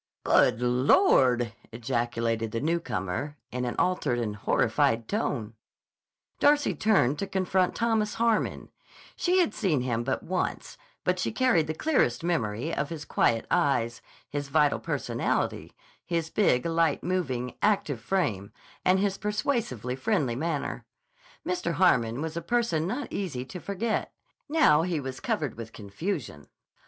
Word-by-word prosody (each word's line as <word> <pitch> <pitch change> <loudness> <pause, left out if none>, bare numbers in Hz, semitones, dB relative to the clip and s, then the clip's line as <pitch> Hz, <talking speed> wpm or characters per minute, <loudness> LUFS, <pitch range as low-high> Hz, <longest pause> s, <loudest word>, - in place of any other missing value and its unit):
"Good 125 0 +3
Lord!" 125 - +4 0.2
ejaculated 115 -2 -1
the 115 - -2
newcomer 145 - -2
in 125 0 -2
an 120 - -3
altered 155 -9 +1
and 110 -3 -2
horrified 115 +2 +1
tone. 125 - -2 0.9
Darcy 290 0 +4
turned 150 - +2
to 200 - -2
confront 185 -1 +1
Thomas 225 -2 0
Harmon. 230 -2 0 0.5
She 360 +1 +1
had 355 -3 +3
seen 165 - +1
him 120 -2 -1
but 130 +2 -2
once, 180 +1 -3 0.3
but - - +1
she - - -1
carried 245 -12 +2
the 155 - -3
clearest 165 - +1
memory 145 -3 -1
of 145 - -1
his 155 -3 -6
quiet 115 -5 +1
eyes, 120 -4 +1 0.3
his 145 -1 -4
vital 150 0 +3
personality, - - -2 0.3
his 165 -2 -2
big, 125 -12 +2
light 165 -2 +1
moving, 130 -9 -2
active 175 - +1
frame, 105 - -1 0.3
and 185 +1 +4
his 195 0 0
persuasively 210 - -1
friendly 135 - 0
manner. 155 +2 -3 0.6
Mr. 360 0 -1
Harmon 125 -7 +2
was 160 0 -4
a 170 - -2
person 200 -8 0
not 250 +7 -4
easy 145 -11 -3
to 180 - -8
forget. 200 +5 -2 0.4
Now 295 - +5
he 170 -2 -1
was 130 -1 -6
covered 145 -7 -1
with 115 -1 -7
confusion. 105 - -5
150 Hz, 140 wpm, -27 LUFS, 120-190 Hz, 0.9 s, Now